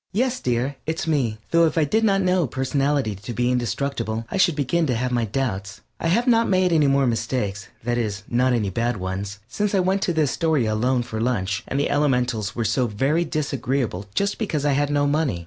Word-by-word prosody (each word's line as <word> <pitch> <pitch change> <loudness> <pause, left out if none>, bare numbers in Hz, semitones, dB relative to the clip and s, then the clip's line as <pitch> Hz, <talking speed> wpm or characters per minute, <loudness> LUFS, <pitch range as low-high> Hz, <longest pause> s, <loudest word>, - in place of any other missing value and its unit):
_) - - -66
Yes, 250 +4 0
dear, 125 +3 -1
it's 160 +1 -2
me, 135 -9 0
though 170 0 +5
if 160 - -3
I 160 - +4
did 220 +10 +1
not 195 -3 +3
know 180 -4 +2
personality 135 -1 0
to 105 +5 -7
be 120 +2 +1
indestructible 120 -1 -2
I - - -1
should 175 -4 +3
begin 155 +4 +1
to 125 - +1
have 125 +2 -1
my 120 -2 +1
doubts. 100 -4 -3 0.2
I - - -1
have 230 +9 +2
not 230 -2 +3
made 185 -2 +3
any 150 -3 +4
more 135 0 +3
mistakes, 110 -4 -2 0.2
that 120 +1 0
is, 105 -3 -3
not 125 +2 +2
any 110 -5 0
bad 115 +3 -1
ones, 95 +2 -4
since 205 - -1
I - - +3
went 190 +2 +1
to 185 - +1
the 160 -1 +2
Astoria 145 -4 +1
alone 125 +3 +1
for 110 -2 -5
lunch, 105 -4 -1
and 135 - -1
the 145 - 0
elementals 125 -7 0
were 115 - -1
so 120 +3 +1
very 135 +10 +1
disagreeable 135 - -2
just 200 0 0
because 160 -10 -1
I 145 - +3
had 145 +1 +1
no 145 0 +2
money. 145 - 0
130 Hz, 220 wpm, -23 LUFS, 115-160 Hz, 0.2 s, though